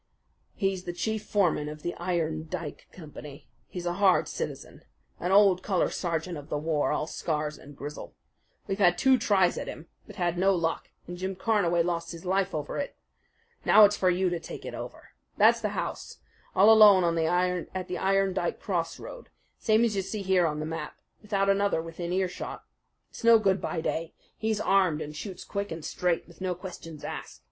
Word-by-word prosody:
"He's 195 -2 -1
the 175 - -4
chief 220 +4 -2
foreman 175 -7 +1
of 150 0 -9
the 175 - -2
Iron 165 -3 -2
Dike 165 -5 -6
Company. 150 -4 -11 0.2
He's 180 -1 -7
a 175 - 0
hard 190 -2 +4
citizen, - - -6 0.4
an 180 - -2
old 195 -2 +5
colour 190 -2 0
sergeant 170 -1 -2
of 145 - -13
the 150 - -1
war, 150 0 0
all - - 0
scars 150 -1 -3
and 145 0 -14
grizzle. 145 +1 -8 0.5
We've 195 +1 -3
had 175 -3 +4
two 265 -1 +4
tries 195 -5 +2
at - - -6
him; 155 - -8 0.2
but - - -11
had 175 -1 -1
no 195 +1 +4
luck, 165 -1 -2 0.2
and 175 +1 -7
Jim 190 +1 -3
Carnaway 180 -5 +2
lost 170 0 -2
his 170 +2 -10
life 190 0 0
over 150 -1 -3
it. 285 - -4 0.7
Now 215 - +8
it's 205 0 +2
for 185 - +2
you 180 0 +1
to 175 - -1
take - - -9
it - - -6
over. - - -8 0.3
That's - - +5
the - - 0
house - - -5 0.4
all 200 +4 +7
alone 210 -4 +8 0.7
at 185 -1 -3
the 180 - -3
Iron 195 0 +2
Dike 175 -2 -2
crossroad, 180 - -4 0.3
same 220 +1 +3
as 220 -3 -1
you 195 - +1
see 195 +2 -5
here 185 -2 +3
on 150 -1 -3
the 155 - -3
map 160 -1 -5 0.2
without 200 -2 0
another 200 -2 +2
within 165 +1 -5
earshot. 185 0 -3 0.5
It's - - -11
no 230 0 +8
good 195 -4 +1
by 160 - -2
day. 165 0 -3 0.2
He's 220 -1 -1
armed 190 -7 +3
and 150 -1 -6
shoots 185 +4 -7
quick 200 -2 -4
and 160 -1 -6
straight, 175 -2 -1
with 170 +1 -17
no 185 -1 -1
questions 170 -4 -9
asked. - - -7
180 Hz, 190 wpm, -28 LUFS, 165-195 Hz, 0.7 s, Now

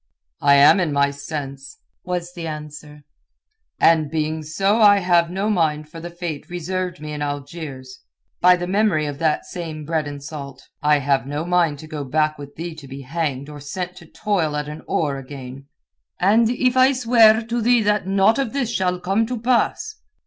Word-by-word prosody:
"I 140 - +5
am 140 +7 +7
in 170 -5 0
my 140 0 +2
sense," 140 -1 -7 0.3
was 175 -1 -4
the 170 -2 -6
answer, 150 -1 -8 0.8
"and 160 -3 +4
being 155 0 -2
so 195 +8 +1
I 205 -1 +7
have 175 -3 +2
no 190 +4 -2
mind 155 -7 0
for 165 - -10
the 170 +1 -7
fate 170 -3 -6
reserved 180 0 -3
me 150 0 -6
in 150 - -5
Algiers—by 145 +3 -2
the 175 0 -4
memory 185 -4 +1
of 145 -1 -5
that 160 -2 0
same 160 -4 -6
bread 155 -1 -1
and 145 -1 -7
salt. 140 -3 -9
I 150 -1 +4
have 135 -2 0
no 145 +3 -3
mind 175 -4 +2
to 155 - -10
go 150 -2 -5
back 155 +2 0
with 145 0 -10
thee 170 +1 -5
to 145 -3 -11
be 135 +1 -8
hanged 140 -1 -3
or 150 -1 -9
sent 180 +5 -5
to 170 - -13
toil 170 -6 -1
at 150 -1 -3
an 150 +1 -7
oar 145 -4 0
again." 135 0 -10 0.5
"And 220 +5 +4
if 250 +1 +1
I 260 +1 +5
swear 230 -3 +5
to 235 +1 -2
thee 240 0 +3
that 210 -2 +1
naught 195 +5 +3
of 265 -4 -2
this 265 -5 -1
shall 180 -4 0
come 195 +5 0
to 250 -1 -4
pass?" 255 - 0
160 Hz, 190 wpm, -21 LUFS, 145-190 Hz, 0.8 s, am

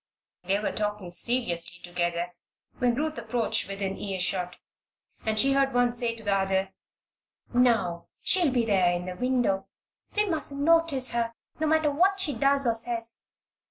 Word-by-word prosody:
They 195 +2 +2
were 210 - -2
talking 210 -4 -4
seriously 175 -5 -1
together 175 0 -2 0.5
when 245 -2 +2
Ruth 305 -1 -2
approached 230 0 -1
within 195 -1 -4
earshot, 180 -2 -1 0.7
and 215 0 +1
she 275 +4 +5
heard 275 -1 +1
one 245 -1 +3
say 235 -1 +3
to 225 - -13
the 205 -1 +1
other: 190 0 0 0.8
"Now, 230 -9 +2
she'll 360 -5 +2
be 245 -2 +1
there 190 -5 +3
in 175 0 -3
the 185 0 -5
window. 245 -4 0 0.5
We 420 0 +2
mustn't 310 -6 -1
notice 330 -5 +3
her, 235 -1 -1 0.2
no 315 - 0
matter 315 -1 +2
what 375 +7 +2
she 320 -7 +5
does 275 0 +2
or 235 - +3
says. 230 0 0
230 Hz, 160 wpm, -27 LUFS, 190-275 Hz, 0.8 s, she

